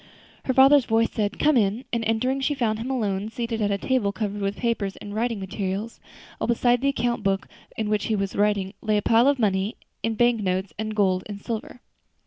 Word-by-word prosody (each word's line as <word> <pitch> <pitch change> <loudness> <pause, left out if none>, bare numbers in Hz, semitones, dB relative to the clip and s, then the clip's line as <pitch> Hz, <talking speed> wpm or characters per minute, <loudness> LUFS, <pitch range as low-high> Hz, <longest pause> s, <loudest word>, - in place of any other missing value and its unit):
Her 260 - +1
father's 270 0 +7
voice 225 +1 +2
said, 205 -2 -2
"Come 305 -1 +3
in," 220 +2 +1
and 235 -1 0
entering, 255 +5 0
she 290 +2 0
found 220 -5 0
him 240 +3 -4
alone, 210 -5 -1
seated 230 -1 -3
at 205 - +1
a 200 - +1
table 230 -2 0
covered 205 0 -3
with 195 +1 -1
papers 225 -5 -1
and 205 - -8
writing 230 0 -1
materials, 195 +3 -4 0.4
while - - -1
beside 240 +1 +2
the 275 - +1
account 240 -3 -1
book 195 -1 0 0.3
in 220 - -1
which 210 0 0
he 220 - 0
was 195 -1 -2
writing 205 -2 +1
lay 215 -1 +1
a 205 - -1
pile 230 +3 +4
of 285 -1 +3
money, 200 -2 0 0.3
in 225 0 -1
bank 240 0 +3
notes, 185 -2 -1
and 215 0 -3
gold 190 -3 +2
and 205 -1 -7
silver. 230 +3 -6
220 Hz, 215 wpm, -24 LUFS, 200-240 Hz, 0.4 s, father's